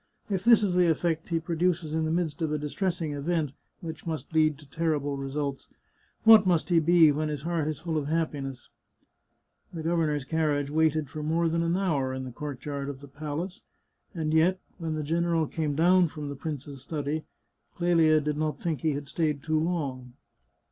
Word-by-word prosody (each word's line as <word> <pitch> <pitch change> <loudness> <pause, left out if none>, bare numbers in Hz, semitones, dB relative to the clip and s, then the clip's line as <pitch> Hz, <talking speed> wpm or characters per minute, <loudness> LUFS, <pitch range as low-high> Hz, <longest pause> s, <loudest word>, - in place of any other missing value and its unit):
If 190 -2 0
this 230 -1 +6
is 195 -3 +1
the 180 -1 +4
effect 165 0 0
he 165 -1 +1
produces 165 -1 -1
in 160 0 +1
the 155 - -1
midst 165 -2 -1
of 160 -2 0
a 150 - +1
distressing 160 +1 -2
event, 150 0 -1 0.3
which 165 0 -7
must 160 0 -4
lead 155 -2 +3
to 150 -1 -15
terrible 145 -2 -1
results, 140 0 -4 0.5
what 220 -3 +8
must 175 -1 +2
he 170 -2 +5
be 165 -1 +6
when 155 +1 -1
his 145 -2 -4
heart 165 -2 -1
is 155 -2 -2
full 160 +1 -2
of 145 - -4
happiness? 145 -5 -3 0.5
" - - -43
The 160 - -4
governor's 155 -4 0
carriage 145 -2 0
waited 155 -1 +2
for 155 - -5
more 165 +3 +1
than 165 +1 0
an 170 +2 +1
hour 140 -9 0
in 130 - -4
the 130 - -6
courtyard 140 +1 -5
of 135 -2 -6
the 140 - -12
palace, 150 +6 -5 0.5
and 155 -2 -1
yet, 175 +4 +3 0.2
when 160 -2 -2
the 155 - -2
general 165 +1 +1
came 150 -1 -2
down 175 +3 +5
from 150 -2 -6
the 140 - -5
prince's 140 -2 -6
study, 150 +2 -3 0.5
Clelia 165 -3 +4
did 150 0 -2
not 155 0 -1
think 160 -7 -2
he 155 -2 +1
had 140 0 -5
stayed 150 -2 -1
too 155 0 +1
long. 140 -7 -2
155 Hz, 195 wpm, -28 LUFS, 145-165 Hz, 0.5 s, what